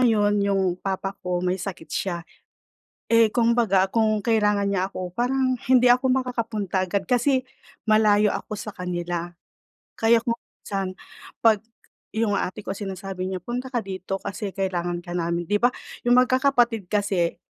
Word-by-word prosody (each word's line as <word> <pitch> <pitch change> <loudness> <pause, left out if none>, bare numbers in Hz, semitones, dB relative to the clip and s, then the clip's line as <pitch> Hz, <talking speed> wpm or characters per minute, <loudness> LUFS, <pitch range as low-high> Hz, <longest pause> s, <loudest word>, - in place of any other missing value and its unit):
ngayon 210 -4 +3
yung 195 -1 +2 0.2
papa 195 0 -2
ko 180 0 -2
may 180 +1 +1
sakit 185 -4 -6
siya. 175 -3 -1 0.9
Eh, 230 -1 +6
kung 235 -1 +3
baga 195 -5 +3
kung 215 -2 +2
kailangan 210 -3 +2
niya 190 -1 +1
ako, 180 -1 -5
parang 255 +1 +1
hindi 250 -1 +6
ako 250 +2 +3
makakapunta 230 -7 -1
agad 195 +1 -1
kasi 255 +1 +2 0.4
malayo 210 -1 +4
ako 215 - -5
sa 210 +1 -6
kanila. 175 -1 -3 0.7
Kaya 230 +1 +4
kung 230 -1 0
minsan, 190 -2 -5 0.5
'pag 215 -3 +5 0.6
yung 220 -2 +1
ate 190 +4 -3
ko - - -3
sinasabi 195 -2 -5
niya, 185 -1 -4
"Punta 250 +2 -4
ka 240 - +1
dito 190 0 -4
kasi 200 0 -5
kailangan 175 -2 -1
ka 175 - -7
namin." 170 0 -1
'Di 205 - +2
ba 245 - +5 0.4
yung 245 0 +5
magkakapatid 250 -5 +3
kasi 200 -5 0
205 Hz, 155 wpm, -24 LUFS, 185-235 Hz, 0.9 s, Eh